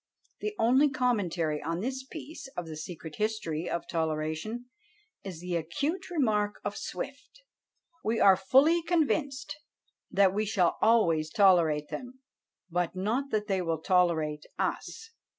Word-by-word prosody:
The 425 0 -3
only 260 +6 +4
commentary 180 - 0
on 165 +3 -2
this 260 +3 -3
piece 300 +1 -9
of 175 - -2
the 160 -1 -7
secret 160 0 -8
history 210 -7 -2
of 170 - -3
toleration 160 +8 -2 0.6
is 180 -4 -7
the 180 -1 -3
acute 285 - -2
remark 215 - +1
of 205 0 -2
Swift: - - -7 0.6
"We 225 +1 0
are 195 -1 +7
fully 270 - +4
convinced 290 -6 0 0.5
that 195 -1 +4
we 210 +1 0
shall 190 -5 +1
always 170 -9 +3
tolerate 165 -6 +4
them, 255 +1 -7 0.5
but 175 0 -1
not 225 +9 -1
that 215 -3 0
they 195 -3 0
will 165 -2 -1
tolerate 160 -4 +1
us." 450 0 -3
200 Hz, 135 wpm, -29 LUFS, 165-255 Hz, 0.6 s, are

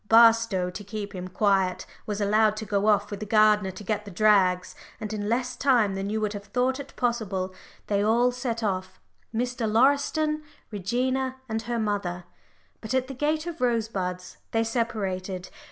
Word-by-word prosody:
Barstow, 225 -5 +5
to 205 - -7
keep 205 0 -6
him 185 -1 -5
quiet, 190 -1 +1 0.2
was 210 -1 -2
allowed 215 +1 +3
to 220 - -4
go 205 +1 0
off 205 -1 +3
with 200 - -4
the 215 - -4
gardener 210 -2 +4
to 190 +2 -9
get 210 +1 -1
the 205 - -9
drags, 185 -2 +3 0.3
and 215 0 -5
in 205 -1 -3
less 250 +2 0
time 240 -7 +3
than 195 +1 -3
you 215 +1 -1
would 210 -1 -1
have 200 -1 -7
thought 255 +4 0
it 280 -1 -9
possible 205 -6 -1 0.3
they 200 -1 +1
all 235 +3 +3
set 245 -2 -3
off 185 -2 -2 0.3
Mr. 235 -1 -1
Lauriston, 285 +5 +2 0.3
Regina, 255 +6 -1
and 220 -1 -2
her 235 +1 -3
mother. 200 -5 -2 0.6
But 230 +4 -3
at 260 0 0
the - - -4
gate 305 +4 0
of 340 -4 -6
Rosebuds 200 -7 -1 0.2
they 225 0 +3
separated. 195 -5 -2
215 Hz, 175 wpm, -26 LUFS, 200-240 Hz, 0.6 s, Barstow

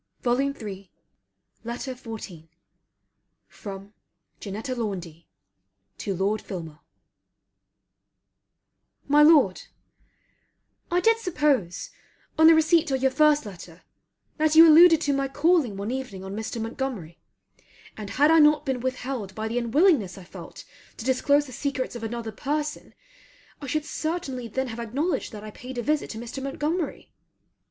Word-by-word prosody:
FILMAR 240 -6 -2 0.8
LETTER 240 +3 -5
XIV 215 -9 -9 1.0
FROM 200 0 -10 0.5
JANETTA 215 +6 -5
LAUNDY 180 -9 -5 0.7
TO 195 - -3
LORD 200 +4 0
FILMAR 160 -5 -8 2.3
My 295 +1 +5
Lord, 295 - +5 1.3
I 355 +1 +1
did 455 +4 +3
suppose, 290 - 0 0.4
on 320 0 +6
the 325 - +8
receipt 320 0 +3
of 265 -1 -1
your 265 - +3
first 300 -1 +3
letter, 180 -3 -11 0.5
that 310 0 +2
you 325 +1 +10
alluded 325 +1 +8
to 290 -3 +1
my 275 0 0
calling 290 - +2
one 200 +4 -4
evening 250 -8 -5
on 190 +1 -6
Mr. 220 +2 -4
Montgomery; 225 - -5 0.8
and 210 -2 -7
had 295 +7 +3
I 325 - +6
not 300 0 +5
been 265 -3 -1
withheld 255 -5 -4
by 220 0 -3
the 235 +2 -1
unwillingness 240 - +2
I 190 - -10
felt 175 0 -11 0.3
to 225 - -8
disclose 285 +3 +2
the 260 - -11
secrets 265 0 -3
of 240 - -6
another 225 0 -4
person 295 +7 -4 0.7
I 280 - -6
should 305 +3 -1
certainly 310 -7 -4
then 265 +4 -3
have 225 0 -7
acknowledged 275 +7 -2
that 210 -1 -8
I 215 - -8
paid 255 +3 -9
a 240 - -2
visit 300 +2 0
to 220 - -7
Mr. 240 +4 -7
Montgomery. 300 +4 -3
255 Hz, 140 wpm, -25 LUFS, 210-300 Hz, 2.3 s, you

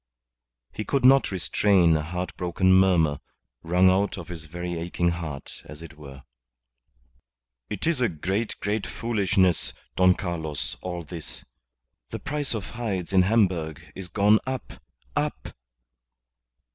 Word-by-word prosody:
He 110 - -4
could 135 +2 0
not 135 +1 +6
restrain 95 -2 +3
a 80 - +1
heart 90 +4 -4
broken 90 +1 +2
murmur, 90 -6 +4 0.4
wrung 90 +2 +4
out 100 +2 +1
of 90 -1 -8
his 85 -3 -6
very 85 +2 -5
aching 85 +1 0
heart, 80 -5 -6
as 75 +2 -10
it 85 0 -11
were. 70 -2 -12 1.5
"It 105 - -4
is 160 -5 +1
a 120 - +3
great, 95 +8 -2
great 105 +1 -1
foolishness, 100 -6 +1 0.2
Don 90 0 +5
Carlos, 80 -6 -4
all 90 -2 -4
this. 70 -6 -7 0.6
The - - -4
price 145 -4 -2
of 100 -6 -5
hides 100 -6 -3
in 95 - +6
Hamburg 90 -7 +1
is 95 -2 -6
gone 105 +4 +4
up 130 -3 -5 0.3
up. - - -2
90 Hz, 135 wpm, -26 LUFS, 85-100 Hz, 1.5 s, not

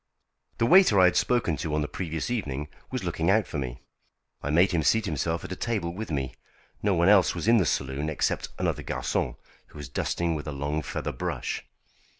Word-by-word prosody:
The 115 - +2
waiter 175 - +6
I 90 - +7
had 90 - +4
spoken 115 -11 +2
to 75 +3 -2
on 75 - +1
the - - -2
previous 80 +4 -4
evening 75 - -3 0.2
was - - -3
looking 80 +2 -1
out 105 +1 +4
for 75 - -4
me. 65 -2 -5 0.6
I 75 - -3
made 85 +5 +4
him 85 -3 +1
seat 110 +8 +3
himself 80 0 -1
at - - -7
a - - -2
table 100 -6 -2
with 110 +4 -6
me. 70 -4 -2 0.5
No 100 -2 +2
one 85 +1 +3
else 100 -4 +5
was 85 +4 -3
in 115 +1 +6
the 90 -7 +2
saloon 70 +3 -1
except 75 - -1
another - - -1
garçon, - - -2 0.3
who - - -15
was 70 -4 -7
dusting 85 +6 -1
with 75 -1 -5
a - - -2
long 70 +2 -2
feather - - -4
brush. - - -3
85 Hz, 210 wpm, -27 LUFS, 75-100 Hz, 0.6 s, I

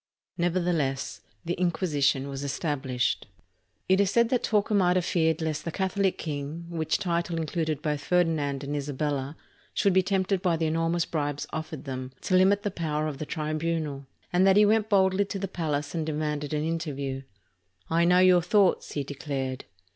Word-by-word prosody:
Nevertheless, 170 -6 -1 0.2
the 175 - 0
Inquisition 150 -6 +1
was 140 0 -5
established. 135 -5 -1 0.6
It 190 +1 +4
is 200 - +2
said 235 +2 +3
that 250 -1 +1
Torquemada 200 -4 +2
feared 160 -3 +1
lest 155 -1 -2
"the 165 - -3
Catholic 190 +1 0
king" 150 +2 -5
— - - -13
which 160 -2 0
title 170 -1 -1
included 155 -2 -2
both 150 -2 -1
Ferdinand 155 -5 +1
and 145 +1 -3
Isabella 145 0 -2 0.2
— - - -33
should 200 - +3
be 190 - +5
tempted 190 0 0
by 175 -4 +2
the 160 - 0
enormous 165 +1 +1
bribes 145 -2 -2
offered 155 -2 -5
them 130 -2 -5
to 185 - +1
limit 195 +2 +4
the 205 - -1
power 155 -3 -2
of 150 -3 -4
the 155 - -4
tribunal; 155 -2 -2 0.3
and 185 +2 +4
that 195 +1 +5
he 210 - +7
went 215 +1 +2
boldly 190 -1 +4
to 200 - -4
the 195 0 -3
palace 150 -5 -2
and 165 -2 -1
demanded 150 -1 -2
an 150 -1 0
interview. 145 -5 -3 0.7
"I 165 +1 +2
know 180 +1 +5
your 185 -1 +6
thoughts," 190 +2 +2
he 145 - -1
declared. 135 -2 -4
160 Hz, 175 wpm, -27 LUFS, 145-185 Hz, 0.7 s, he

